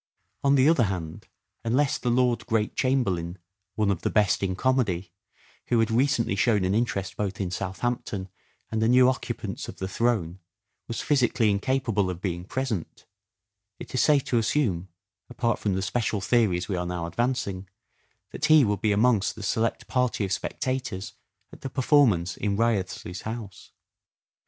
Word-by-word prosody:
On 140 0 +4
the 135 +1 +5
other 155 -8 +4
hand, 90 -5 -5 0.4
unless 130 +5 +1
the 125 - -1
Lord 125 0 +1
Great 110 -2 0
Chamberlain 95 -10 0
— 95 +1 -57
" - - -57
one 105 -2 +2
of 95 - -2
the - - 0
best 105 -3 +2
in 95 -2 -1
comedy 100 -7 0 0.2
" - - -33
— - - -32
who 120 - +2
had 115 0 +2
recently 120 -3 +2
shown 105 -2 +2
an 95 - +1
interest 105 -4 -1
both 100 -2 -3
in 95 -3 -2
Southampton 95 +1 -3 0.4
and 110 -1 -1
the 110 - +3
new 125 +1 +6
occupants 130 0 -3
of - - -8
the 95 - -3
throne 95 -5 0 0.5
was 115 - -3
physically 120 -6 +2
incapable 110 -2 0
of 90 -2 -4
being 90 -2 -3
present, 115 -6 -4 0.7
it - - -9
is 130 - +2
safe 145 -3 +4
to 120 - +1
assume, 110 - 0 0.4
apart 120 -2 -1
from 100 -3 0
the 95 - -1
special 105 +1 -1
theories 95 -3 +1
we 95 - -2
are 90 0 -2
now 90 -1 -3
advancing, 100 -2 -2 0.6
that - - -2
he 155 -3 +6
would 105 -2 -1
be 110 - +2
amongst 105 -1 +2
the 110 - -8
select 115 +3 -1
party 125 -5 0
of 95 - -5
spectators 120 -5 -3 0.4
at - - -13
the 135 - -4
performance 125 - +3
in 100 -2 -1
Wriothesley 100 -6 -1
's 90 - -6
house. 110 -3 -7
110 Hz, 175 wpm, -26 LUFS, 95-125 Hz, 0.7 s, new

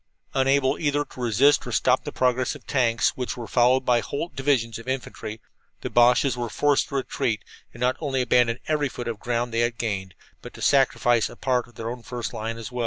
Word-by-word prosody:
Unable 135 0 +2
either 145 -1 0
to - - -15
resist 125 +5 +4
or - - -12
to - - -5
stop - - +2
the - - -4
progress 125 0 +1
of - - -13
the - - -8
tanks, 120 -3 +3
which 125 -1 -5
were 120 - -5
followed 125 +3 +3
by 120 -1 +4
whole 145 +8 -4
divisions 130 -5 0
of 115 - -12
infantry, 125 -4 -4 0.4
the - - -5
Boches 125 +2 +4
were 120 -1 -3
forced 145 +3 +2
to 140 - -7
retreat 120 -4 -2 0.3
and 120 - -13
not 125 +1 +1
only 135 -4 -1
abandon 120 -1 +3
every 150 -2 +1
foot 120 -1 -7
of 115 -2 -3
the - - -23
ground 120 0 -1
they 115 - +1
had 120 0 0
gained, 95 -5 -3 0.3
but - - -11
to - - -11
sacrifice 120 -4 +3
a - - -11
part 125 -2 0
of 120 - -21
their 115 +1 -4
own 125 0 -7
first 120 0 -5
line 115 +1 -4
as 115 +1 -7
well. 125 - -5
125 Hz, 235 wpm, -24 LUFS, 115-135 Hz, 0.4 s, resist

